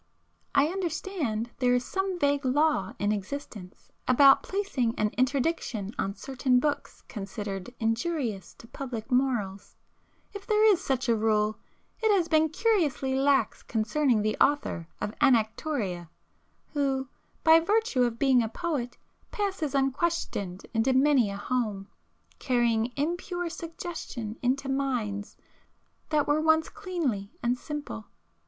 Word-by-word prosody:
I 280 - +6
understand 325 - -2
there 250 -1 +3
is 250 0 0
some 385 -1 -2
vague 285 -2 +1
law 265 -6 +2
in 205 +1 0
existence 210 -3 -6 0.2
about 270 +2 +7
placing 335 - -1
an 210 - +2
interdiction 255 -5 -1
on 195 +1 -1
certain 260 0 +1
books 295 +3 -3
considered 200 -1 -5
injurious 225 - -2
to 230 - -14
public 245 -2 -6
morals,—if 250 - -3
there 430 0 +4
is 370 0 -2
such 260 -2 -1
a 230 - +4
rule, 215 -1 +1 0.4
it 440 -1 +3
has 350 -4 +1
been 315 -1 +3
curiously 320 - +1
lax 270 -3 +2
concerning 225 +1 +1
the 215 0 0
author 280 - +1
of 210 - -3
'Anactoria'—who, 245 - -1 0.4
by 320 0 +8
virtue 415 - +1
of 240 -2 +1
being 260 -1 +4
a 225 - -1
poet, 280 -5 -3 0.3
passes 380 -9 -2
unquestioned 270 - -1
into 230 +3 +2
many 265 -4 +4
a 200 - -5
home, 210 -3 -2 0.5
carrying 240 -2 +1
impure 350 +3 -2
suggestion 325 -10 -6
into 265 +2 0
minds 245 -7 -2 0.7
that 300 -2 +2
were 295 +1 +2
once 315 0 +3
cleanly 330 - -3
and 240 +1 +2
simple. 295 -7 -6
265 Hz, 125 wpm, -28 LUFS, 220-315 Hz, 0.7 s, by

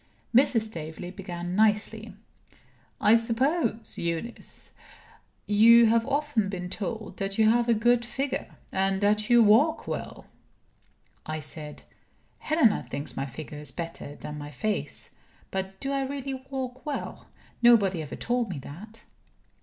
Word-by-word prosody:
Mrs. 240 -2 +5
Staveley 175 -3 -6
began 175 -2 -5
nicely; 215 0 +1 0.8
"I 210 - +5
suppose, 230 0 +1
Eunice, 170 +8 -3 0.7
you 230 +3 +7
have 230 +1 +3
often 280 -7 0
been 180 -2 -5
told 215 0 -5
that 195 0 -3
you 220 -1 +5
have 240 0 +2
a 230 - +5
good 240 +2 +3
figure, 270 +3 -4 0.2
and 190 0 +1
that 210 +1 +2
you 240 -1 +7
walk 230 +10 +4
well?" - - -5 1.0
I 155 0 -3
said: 150 0 -8 0.6
"Helena 305 -9 +3
thinks 140 - -6
my 135 - -2
figure 150 +2 -8
is 150 -3 -2
better 165 -3 -6
than 150 0 -7
my 145 0 -7
face. 205 +9 -2 0.3
But 190 0 -4
do 275 - -2
I 275 0 0
really 275 0 -4 0.2
walk 260 -1 -5
well? 295 -2 -5 0.3
Nobody 205 -8 +5
ever 150 - -6
told 240 -2 -1
me 175 - -4
that." 190 +12 -10
215 Hz, 140 wpm, -27 LUFS, 180-240 Hz, 1.0 s, you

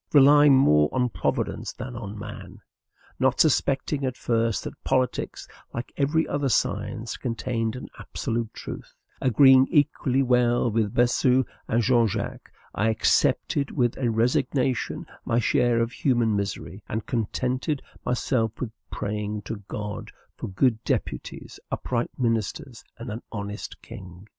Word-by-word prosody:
Relying 145 0 +7
more 75 - +5
on 125 -1 +1
Providence - - -2
than 125 0 -7
on 110 -2 -6
men; 105 - -8 0.6
not 130 0 +2
suspecting 140 -1 +2
at 130 -2 -2
first 115 -2 0
that - - -8
politics, 130 -2 -1 0.3
like 120 - -5
every 150 +3 +1
other 145 -2 0
science, 110 0 -1
contained 115 -2 -2
an 125 - -7
absolute 115 -1 -3
truth; - - -8 0.3
agreeing 130 +1 +6
equally 140 -3 +2
well 120 -1 +3
with 110 0 0
Bossuet 125 +1 +3 0.2
and 115 +1 +1
Jean 120 0 +4
Jacques, - - -5 0.2
I 110 +3 +1
accepted 140 +5 +2
with 120 -4 0
resignation 125 +2 0 0.2
my 115 - 0
share 120 +1 +2
of 115 0 0
human 120 -5 +1
misery, 100 -1 -4
and 110 0 -3
contented 130 +5 -1 0.2
myself 120 -2 0
with 120 -4 -3 0.2
praying 105 0 -3
to 110 - -5
God 105 -1 -5 0.3
for - - -6
good 110 +4 +1
deputies, - - -3
upright 120 -1 -2
ministers, 115 0 -2
and 120 -1 -6
an 110 +3 -5
honest 105 -1 -6
king. 95 +1 -11
120 Hz, 135 wpm, -25 LUFS, 110-130 Hz, 0.6 s, Relying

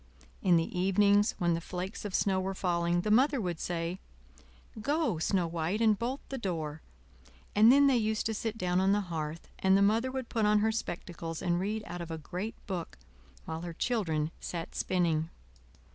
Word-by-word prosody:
In 180 -3 +4
the 165 +1 0
evenings, 200 +3 +4
when 175 -1 +2
the 165 - -1
flakes 180 +4 -5
of 200 - -3
snow 190 -2 +2
were 190 +1 -2
falling, 175 -1 +1
the 210 - -1
Mother 270 +5 +4
would 175 -6 -3
say: 175 +1 -3 0.8
"Go, 285 - 0
Snow 180 +2 +1
White, 165 +4 -2
and 220 -2 +4
bolt 250 +4 -2
the 270 - -4
door;" 160 -7 -3 0.7
and 215 +3 +8
then 280 +2 +6
they 270 -3 +5
used 220 -1 0
to 225 - 0
sit 225 +1 -3
down 180 -2 +1
on 195 +1 +4
the 205 - +2
hearth, 165 -3 -5
and 190 0 +4
the - - +3
Mother 225 +5 +2
would 260 -2 -4
put 220 -3 +1
on 210 0 +4
her 220 +1 +2
spectacles 170 -6 -5
and 175 -1 +1
read 210 +3 -2
out 175 0 -6
of 170 - -6
a 165 - -4
great 185 +8 -5
book 180 -4 -5 0.5
while 160 0 -4
her 170 -1 -5
children 165 -8 -1
sat 170 -2 -5
spinning. 165 -3 0
190 Hz, 190 wpm, -30 LUFS, 170-220 Hz, 0.8 s, and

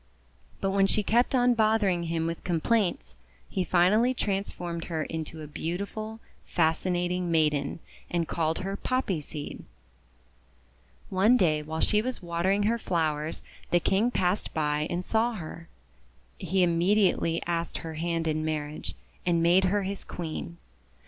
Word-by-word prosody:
But 195 - +1
when 195 0 +4
she 210 - +1
kept 240 +6 +2
on 245 -1 +4
bothering 215 -6 +2
him 165 0 -1
with 165 0 -3
complaints, 185 - 0 0.3
he 190 - -1
finally 210 +9 +3
trans 200 -3 -1
formed 170 -1 -5
her 160 -2 -2
into 160 0 -5
a - - -7
beautiful, 200 +8 -4 0.3
fascinating 175 +2 0
maiden, 150 -4 +1 0.3
and 170 -2 0
called 160 0 0
her 195 0 -2
Poppy 205 -8 -1
Seed. 145 0 -7 1.5
One 205 +6 +5
day 155 -7 +2
while 160 +1 -4
she 210 -1 +4
was 255 +2 -3
watering 180 +3 0
her 230 +3 +1
flowers 155 -5 -1 0.3
the 175 - +4
King 200 +7 +2
passed 185 -4 0
by 150 -1 0
and 180 +1 -2
saw 230 +2 +1
her. 165 -3 -8 0.7
He 185 0 +1
immediately 175 -1 +3
asked 170 -1 -2
her 165 -1 -6
hand 165 +1 -1
in 155 0 0
marriage, 155 -1 -3 0.3
and 170 -2 +2
made 180 +3 +5
her 200 +2 +1
his 195 +1 -4
Queen. 170 0 -6
175 Hz, 145 wpm, -28 LUFS, 160-200 Hz, 1.5 s, One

